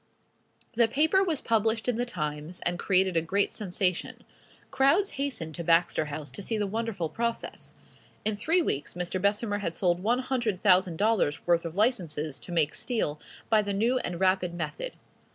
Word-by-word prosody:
The 235 0 +4
paper 315 - +3
was 330 -7 -1
published 225 0 +1
in 245 - +2
the 245 +2 -1
"Times," 150 -3 -4
and 175 0 -1
created 190 -2 +2
a 165 - +3
great 195 +5 0
sensation. 185 -3 -2 0.5
Crowds 290 +10 +3
hastened 270 - -3
to 170 - -5
Baxter 165 -1 +3
House 145 -2 -6
to 170 - -7
see 220 +3 -2
the 210 - 0
wonderful 210 -4 -2
process. 235 +7 -4 0.5
In 215 0 +1
three 330 - +2
weeks 145 - -2
Mr. 180 +1 -3
Bessemer 205 +1 +1
had 170 -5 -3
sold 175 -1 +1
one 230 +5 +2
hundred 240 -7 -1
thousand 185 -4 +4
dollars 205 -8 +1
worth 170 -1 +2
of 165 0 -5
licenses 165 - 0
to - - -10
make 160 -4 +2
steel 185 - -1 0.3
by 220 -2 +4
the 200 -1 -2
new 235 +6 +2
and 175 -6 -4
rapid 185 -2 +2
method. 175 - -4
195 Hz, 175 wpm, -28 LUFS, 170-230 Hz, 0.5 s, The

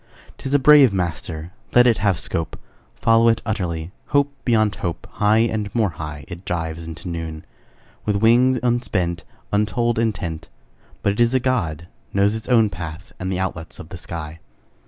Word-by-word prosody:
'Tis 135 - -5
a 145 - +5
brave 145 -3 +7
master; 85 -2 -3 0.2
Let 125 0 +8
it 120 -3 +4
have 100 -4 +2
scope: 80 -1 -3 0.4
Follow 115 0 +4
it 115 -1 +4
utterly, 90 -7 -2 0.2
Hope 140 0 +2
beyond 110 -4 +2
hope: 85 -3 -4 0.2
High 105 +2 +5
and 110 -2 0
more 110 -5 +2
high 75 -1 -7
It 90 0 -8
dives 80 -2 -3
into 80 +2 -8
noon, 80 -2 -5 0.6
With 105 - 0
wing 120 +5 +4
unspent, 105 -8 0 0.3
Untold 110 +3 +1
intent; 100 -8 -2 0.5
But 100 - +2
it 105 - -7
is 120 +2 +3
a - - +4
God, 85 - -1 0.3
Knows 100 +2 +3
its 110 +2 -6
own 115 -4 +4
path 80 +1 -7
And 95 0 -3
the 95 - -1
outlets 85 -3 -4
of - - -10
the - - -7
sky. 80 -1 -7
100 Hz, 170 wpm, -22 LUFS, 85-115 Hz, 0.6 s, Let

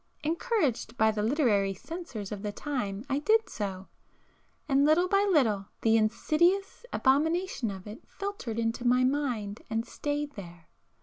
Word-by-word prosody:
Encouraged 310 - 0
by 220 0 +4
the 210 -1 -2
'literary 210 -6 +2
censors' 265 - -7
of 205 -2 -5
the 210 0 -3
time, 215 -4 -4
I 275 0 0
did 440 +7 +3
so, 195 - -5 0.8
and 275 -1 +3
little 315 +5 +4
by 395 +2 +3
little 215 - +2
the 225 0 +4
insidious 340 - +1
abomination 310 - +1
of 190 -2 -7
it 215 +4 -9
filtered 395 - -5
into 230 +1 -1
my 250 +1 +4
mind 250 -7 -1
and 225 +1 -1
stayed 290 +3 -3
there. 175 - -11
250 Hz, 145 wpm, -29 LUFS, 210-310 Hz, 0.8 s, by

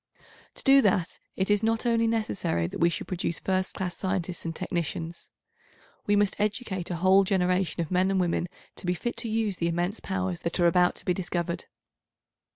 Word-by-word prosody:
To - - -5
do 275 0 +7
that 185 -5 +1 0.2
it 190 +2 0
is 205 -1 +3
not 225 +1 0
only 230 -1 +3
necessary 160 - 0
that 85 - -5
we 170 - +5
should 170 - -4
produce 170 -2 -2
first 190 0 -1
class 180 -2 -3
scientists 185 -2 -2
and 165 0 -3
technicians. 170 0 -4 0.8
We 205 - +4
must 205 -1 +2
educate 205 -3 -1
a 175 - -2
whole 190 +3 +5
generation 185 -2 +1
of 165 - -9
men 185 +1 +3
and 195 -1 +1
women 175 -1 0 0.3
to - - -7
be 180 - +2
fit 240 +7 -3
to 235 -1 -2
use 215 -3 0
the 170 - 0
immense 175 +5 -1
powers 185 -2 -3
that 170 +2 -2
are 175 - +4
about 180 +1 +4
to - - -9
be 180 - +2
discovered. 175 -1 -2
185 Hz, 195 wpm, -27 LUFS, 175-205 Hz, 0.8 s, do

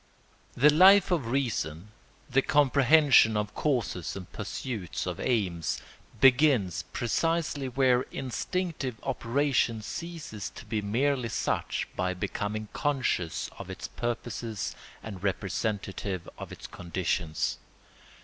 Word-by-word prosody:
] - - -33
The 150 - +9
Life 190 +4 +7
of 155 -10 +1
Reason, 105 - -1 0.4
the 135 -1 +3
comprehension 140 -4 +5
of 105 -1 -2
causes 120 - -1
and 95 -2 -7
pursuit 105 - -4
of - - -4
aims, 95 -9 0 0.4
begins 130 - +4
precisely 150 +2 0
where 125 -1 +3
instinctive 135 - -3
operation 125 -3 0
ceases 160 - -6
to - - -10
be 110 -2 -2
merely 125 +4 0
such - - -1
by 90 0 -1
becoming 105 +4 -3
conscious 130 - 0
of - - -7
its - - -6
purposes 120 -2 -4 0.3
and 100 -5 -7
representative 95 -1 -2
of - - -8
its - - -9
conditions. 85 -3 -2
120 Hz, 110 wpm, -28 LUFS, 100-140 Hz, 0.4 s, The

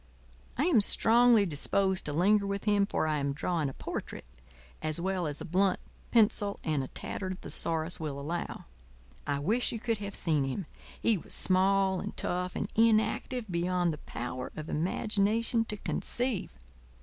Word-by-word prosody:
I - - +2
am 280 -12 +4
strongly 230 +1 +5
disposed 190 +4 0
to 150 - -1
linger 200 +5 +3
with 200 0 -3
him, 205 -2 +3
for - - 0
I 155 -1 0
am 140 0 -1
drawing 155 0 -1
a - - -8
portrait - - -6 0.6
as 155 +1 0
well 185 -1 -1
as 145 -1 -4
a - - -4
blunt 185 +2 +2 0.3
pencil 210 -3 +3
and 155 -3 0
a 130 - -4
tattered 185 +5 -5
thesaurus 165 +1 -2
will 150 -3 -4
allow. 165 +5 -4 0.6
I 145 -1 0
wish 215 +13 +1
you 230 - -4
could 230 -1 -1
have 200 -1 -6
seen 155 -4 +1
him: 135 +8 -3 0.3
he 220 -5 +2
was - - -5
small 190 0 +3
and - - -6
tough 180 0 -2
and - - -2
inactive 225 +2 +2
beyond 175 0 +1
the 150 - -8
power 125 -1 -5
of 155 +1 -6
imagination 215 +7 +1
to 210 - -5
conceive. 240 - -2
185 Hz, 165 wpm, -30 LUFS, 155-210 Hz, 0.6 s, strongly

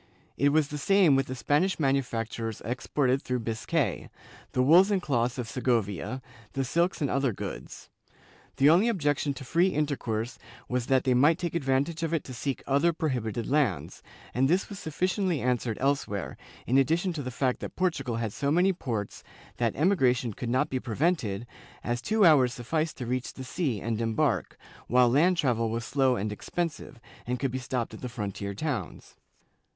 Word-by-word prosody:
It 140 +3 +3
was 150 0 +2
the 150 - -5
same 180 -1 +4
with 135 0 +1
the 130 - -4
Spanish 150 +9 +1
manufactures 115 -5 -1
exported 130 +2 0
through 125 -1 -2
Biscay 110 -1 -1 0.2
— - - -21
the 125 - +2
wools 175 +8 +6
and 200 -2 +2
cloths 120 -7 0
of 125 -3 -3
Segovia, 120 0 -1 0.3
the 135 - -1
silks 170 +7 0
and 140 - +1
other 135 -2 +1
goods. 100 - -7 0.7
The 135 - +5
only 175 +9 +5
objection 145 -9 0
to 135 - -8
free 170 +8 +2
intercourse 125 - -2 0.3
was 125 -1 -2
that 130 -1 +3
they 130 - +2
might 145 +6 +4
take 175 -2 -3
advantage 145 +1 0
of 165 0 0
it 160 - -2
to 130 - -9
seek 135 +2 -3
other 140 +5 +2
prohibited 120 -8 -2
lands, 135 - 0 0.3
and 130 +2 +2
this 185 +4 +1
was 200 -2 -7
sufficiently 180 +1 -1
answered 120 -3 -1
elsewhere, 135 -8 -1 0.3
in 130 +3 +3
addition 170 +6 +1
to 155 - -4
the 130 - -4
fact 125 0 -1
that - - -7
Portugal 145 -10 -1
had 115 -2 -2
so 140 - -1
many 180 +5 +3
ports 115 - -4 0.3
that 115 -2 0
emigration 130 - +2
could 120 - -5
not 130 +5 +1
be 130 - 0
prevented, 120 - -1 0.4
as 120 0 -2
two 215 +3 +3
hours 130 -7 +5
sufficed 155 +6 -2
to 125 - -5
reach 125 +1 -3
the 130 - -7
sea 130 - -2
and 115 +2 -2
embark, 115 -1 0 0.3
while 125 +1 +5
land 170 +8 +3
travel 115 -7 +1
was 115 +1 -3
slow 135 -2 +2
and 105 -1 -2
expensive, 155 +3 -4 0.3
and 125 +1 -1
could 135 -2 -1
be 130 - -3
stopped 125 -3 -3
at 110 - -9
the 125 - -4
frontier 100 -4 -5
towns. 120 - -4
130 Hz, 180 wpm, -28 LUFS, 120-155 Hz, 0.7 s, wools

